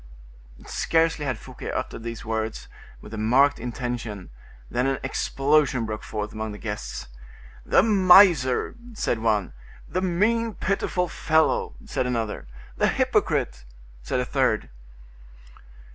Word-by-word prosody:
Scarcely 165 Hz, -2 st, +1 dB
had 130 Hz, -4 st, -1 dB
Fouquet -, -, -9 dB
uttered -, -, -4 dB
these 115 Hz, 0 st, -6 dB
words, 110 Hz, 0 st, -3 dB, 0.3 s
with 105 Hz, -, -11 dB
a 110 Hz, -, -4 dB
marked 135 Hz, +6 st, +4 dB
intention, 120 Hz, -, -5 dB, 0.4 s
than 125 Hz, -, 0 dB
an 135 Hz, -, 0 dB
explosion 140 Hz, -3 st, +1 dB
broke 110 Hz, -1 st, -4 dB
forth 105 Hz, 0 st, -5 dB
among 110 Hz, 0 st, -4 dB
the -, -, -8 dB
guests. 105 Hz, -1 st, -5 dB, 0.6 s
"The -, -, +5 dB
miser!" 185 Hz, -, +5 dB, 0.2 s
said 120 Hz, -, -1 dB
one. 110 Hz, -3 st, 0 dB, 0.3 s
"The 185 Hz, -, -2 dB
mean, 215 Hz, +5 st, +1 dB
pitiful 185 Hz, -2 st, -1 dB
fellow!" 160 Hz, -1 st, +1 dB
said 125 Hz, -, -2 dB
another. 115 Hz, -, -3 dB, 0.3 s
"The -, -, +3 dB
hypocrite!" 60 Hz, 0 st, 0 dB, 0.4 s
said 65 Hz, -, -2 dB
a 125 Hz, -, 0 dB
third. 125 Hz, -, 0 dB
125 Hz, 125 wpm, -25 LUFS, 110-160 Hz, 0.6 s, The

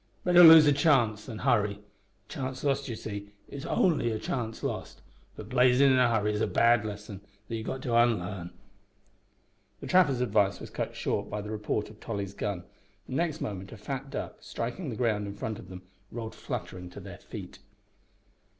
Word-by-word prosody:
Better 175 Hz, -1 st, +6 dB
lose 160 Hz, -2 st, +11 dB
a 145 Hz, -, +5 dB
chance 130 Hz, -8 st, +2 dB
than 115 Hz, -4 st, -6 dB
hurry. 105 Hz, -2 st, +2 dB
A 105 Hz, -1 st, -27 dB
chance 130 Hz, -3 st, -5 dB
lost 140 Hz, -1 st, 0 dB
you 115 Hz, -, -3 dB
see, 100 Hz, -2 st, -7 dB, 0.2 s
is 140 Hz, -1 st, -7 dB
only 160 Hz, -10 st, +2 dB
a 110 Hz, -, -1 dB
chance 115 Hz, 0 st, -4 dB
lost, -, -, -4 dB, 0.4 s
but -, -, -9 dB
blazin' 125 Hz, +2 st, +5 dB
in 130 Hz, -, +4 dB
a 125 Hz, -1 st, +4 dB
hurry 105 Hz, -2 st, +1 dB
is 105 Hz, -, -2 dB
a -, -, +2 dB
bad 115 Hz, -1 st, +4 dB
lesson 105 Hz, -2 st, -7 dB, 0.3 s
that 115 Hz, -, -4 dB
ye've 110 Hz, 0 st, -5 dB
got 130 Hz, -, -4 dB
to 120 Hz, -3 st, 0 dB
unlarn." 100 Hz, -6 st, +1 dB, 1.3 s
The -, -, -8 dB
trapper's 160 Hz, -9 st, +4 dB
advice 105 Hz, -5 st, +2 dB
was -, -, -9 dB
cut -, -, -4 dB
short 100 Hz, -, -2 dB
by 105 Hz, -, -3 dB
the 105 Hz, +1 st, -7 dB
report 105 Hz, 0 st, -2 dB
of 105 Hz, -, -17 dB
Tolly's 100 Hz, -3 st, -4 dB
gun, 100 Hz, -4 st, -3 dB, 0.4 s
and 130 Hz, -, -6 dB
next 160 Hz, 0 st, -1 dB
moment 95 Hz, -2 st, -5 dB
a -, -, -10 dB
fat 135 Hz, +5 st, -5 dB
duck, -, -, -5 dB
striking 125 Hz, +8 st, -5 dB
the 115 Hz, -, -4 dB
ground 110 Hz, -4 st, 0 dB
in 100 Hz, -, -6 dB
front 110 Hz, +1 st, -4 dB
of 95 Hz, -, -12 dB
them, 90 Hz, 0 st, -9 dB, 0.3 s
rolled 115 Hz, -1 st, -6 dB
fluttering 90 Hz, -1 st, -6 dB
to -, -, -10 dB
their -, -, -10 dB
feet. -, -, -9 dB
110 Hz, 195 wpm, -29 LUFS, 105-130 Hz, 1.3 s, lose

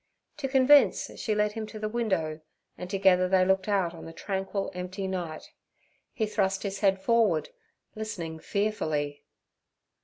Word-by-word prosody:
To 290 Hz, -2 st, -2 dB
convince 270 Hz, +2 st, +4 dB
she 215 Hz, -, -1 dB
led 210 Hz, 0 st, +2 dB
him 215 Hz, 0 st, -5 dB
to 215 Hz, -, -9 dB
the 215 Hz, 0 st, -2 dB
window, 190 Hz, -9 st, -1 dB, 0.3 s
and 180 Hz, -, -7 dB
together 185 Hz, -2 st, +3 dB
they 185 Hz, -1 st, +4 dB
looked 190 Hz, +1 st, +2 dB
out 190 Hz, -5 st, +1 dB
on 165 Hz, -, -10 dB
the 165 Hz, -, -8 dB
tranquil, 195 Hz, +1 st, -3 dB
empty 185 Hz, +2 st, -4 dB
night. 175 Hz, -4 st, -5 dB, 0.6 s
He 220 Hz, -, -1 dB
thrust 195 Hz, -2 st, 0 dB
his 195 Hz, -1 st, -3 dB
head 195 Hz, -1 st, +3 dB
forward, 230 Hz, -, +2 dB, 0.4 s
listening 175 Hz, -7 st, -5 dB
fearfully. 155 Hz, -9 st, -1 dB
195 Hz, 150 wpm, -28 LUFS, 180-215 Hz, 0.6 s, convince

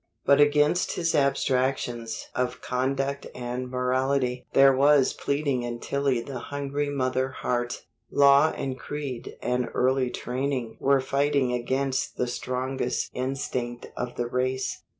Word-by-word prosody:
But 140 Hz, +1 st, +6 dB
against 150 Hz, +4 st, +3 dB
his 165 Hz, -2 st, 0 dB
abstractions 130 Hz, -4 st, 0 dB
of 125 Hz, 0 st, -1 dB
conduct 135 Hz, +2 st, -1 dB
and 125 Hz, +1 st, -4 dB
morality 125 Hz, 0 st, 0 dB
there 135 Hz, 0 st, +6 dB
was 140 Hz, 0 st, +4 dB
pleading 140 Hz, -3 st, -1 dB
in 120 Hz, 0 st, -4 dB
Tillie 140 Hz, -3 st, 0 dB
the 130 Hz, +1 st, -6 dB
hungry 145 Hz, +2 st, -3 dB
mother 130 Hz, -1 st, 0 dB
heart; 120 Hz, -2 st, -2 dB, 0.3 s
law 140 Hz, +2 st, +6 dB
and 130 Hz, -3 st, -4 dB
creed 140 Hz, -5 st, -6 dB
and 125 Hz, 0 st, 0 dB
early 130 Hz, 0 st, +2 dB
training 125 Hz, -2 st, -3 dB
were 135 Hz, -1 st, +3 dB
fighting 140 Hz, -1 st, +1 dB
against 130 Hz, +2 st, -1 dB
the 125 Hz, -, +1 dB
strongest 125 Hz, +1 st, -2 dB
instinct 125 Hz, -2 st, -3 dB
of 125 Hz, 0 st, -4 dB
the 120 Hz, -, -1 dB
race. 130 Hz, +2 st, -1 dB
130 Hz, 130 wpm, -26 LUFS, 125-140 Hz, 0.3 s, But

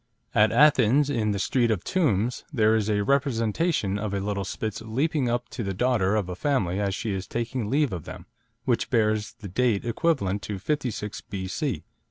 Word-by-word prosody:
At 105 Hz, 0 st, +4 dB
Athens, 140 Hz, +1 st, +5 dB
in 110 Hz, -5 st, 0 dB
the 100 Hz, -, 0 dB
Street 120 Hz, +4 st, +1 dB
of 105 Hz, -6 st, 0 dB
Tombs, 125 Hz, -, 0 dB
there 110 Hz, -5 st, +3 dB
is 110 Hz, -1 st, 0 dB
a 105 Hz, -1 st, +1 dB
representation 120 Hz, -, +1 dB
of 105 Hz, -1 st, -2 dB
a -, -, 0 dB
little 100 Hz, 0 st, -2 dB
Spitz 110 Hz, +3 st, -4 dB
leaping 130 Hz, +4 st, 0 dB
up 120 Hz, +1 st, -1 dB
to 125 Hz, -, -5 dB
the 95 Hz, -1 st, -3 dB
daughter 110 Hz, -3 st, +2 dB
of 105 Hz, -4 st, 0 dB
a 90 Hz, -, -5 dB
family 100 Hz, -7 st, 0 dB
as 100 Hz, -1 st, 0 dB
she 110 Hz, -3 st, -3 dB
is 95 Hz, 0 st, -4 dB
taking 115 Hz, -1 st, -3 dB
leave 140 Hz, -3 st, +2 dB
of 85 Hz, -4 st, -5 dB
them, -, -, -9 dB, 0.4 s
which -, -, +1 dB
bears 110 Hz, -1 st, +1 dB
the 115 Hz, -3 st, -10 dB
date 115 Hz, +2 st, +1 dB
equivalent 115 Hz, -, 0 dB
to 100 Hz, -1 st, -4 dB
56 120 Hz, -4 st, -3 dB
B.C. 95 Hz, -3 st, -3 dB
110 Hz, 190 wpm, -26 LUFS, 100-125 Hz, 0.4 s, Athens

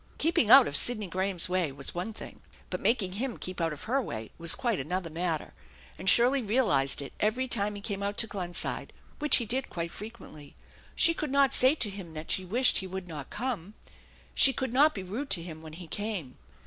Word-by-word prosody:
Keeping 310 Hz, -8 st, +2 dB
out 270 Hz, +1 st, +9 dB
of 145 Hz, -, -5 dB
Sidney 215 Hz, +2 st, +2 dB
Graham's 185 Hz, 0 st, -1 dB
way 180 Hz, -5 st, 0 dB
was 140 Hz, +1 st, -5 dB
one 180 Hz, +6 st, -4 dB
thing, 220 Hz, -, -11 dB, 0.3 s
but -, -, -3 dB
making 220 Hz, -6 st, +1 dB
him 240 Hz, +4 st, -3 dB
keep 185 Hz, -1 st, -5 dB
out 165 Hz, -1 st, 0 dB
of 150 Hz, -, -8 dB
her 265 Hz, +5 st, 0 dB
way 110 Hz, -, -7 dB
was 165 Hz, -1 st, +5 dB
quite 235 Hz, -5 st, -1 dB
another 170 Hz, +4 st, -3 dB
matter, 165 Hz, -1 st, -2 dB, 0.4 s
and 185 Hz, -, 0 dB
Shirley 250 Hz, +6 st, +4 dB
realized 200 Hz, -, +2 dB
it 135 Hz, -, -10 dB
every 240 Hz, +5 st, 0 dB
time 210 Hz, -4 st, 0 dB
he 205 Hz, -, -8 dB
came 200 Hz, -1 st, -4 dB
out 200 Hz, 0 st, -3 dB
to 230 Hz, -, +5 dB
Glenside, 180 Hz, -5 st, -3 dB, 0.3 s
which 300 Hz, -1 st, +3 dB
he 235 Hz, -, -2 dB
did 255 Hz, +5 st, -2 dB
quite 170 Hz, -1 st, -4 dB
frequently. 205 Hz, -10 st, -11 dB, 0.4 s
She 335 Hz, -, +6 dB
could 305 Hz, -2 st, -4 dB
not 275 Hz, 0 st, +3 dB
say 260 Hz, +4 st, +4 dB
to 230 Hz, -9 st, 0 dB
him 180 Hz, -5 st, -9 dB
that 155 Hz, +1 st, -6 dB
she 190 Hz, -, 0 dB
wished 235 Hz, +8 st, +3 dB
he 190 Hz, -, -6 dB
would 190 Hz, 0 st, -7 dB
not 150 Hz, -5 st, -8 dB
come. 215 Hz, -5 st, -4 dB, 0.6 s
She 270 Hz, -, +7 dB
could 260 Hz, -1 st, -3 dB
not 295 Hz, +4 st, +4 dB
be 195 Hz, -, -5 dB
rude 230 Hz, +10 st, -5 dB
to 170 Hz, -, +1 dB
him. 160 Hz, -2 st, -9 dB
when 160 Hz, -1 st, -11 dB
he 175 Hz, +2 st, -9 dB
came. 185 Hz, -7 st, -4 dB
200 Hz, 215 wpm, -28 LUFS, 170-245 Hz, 0.6 s, out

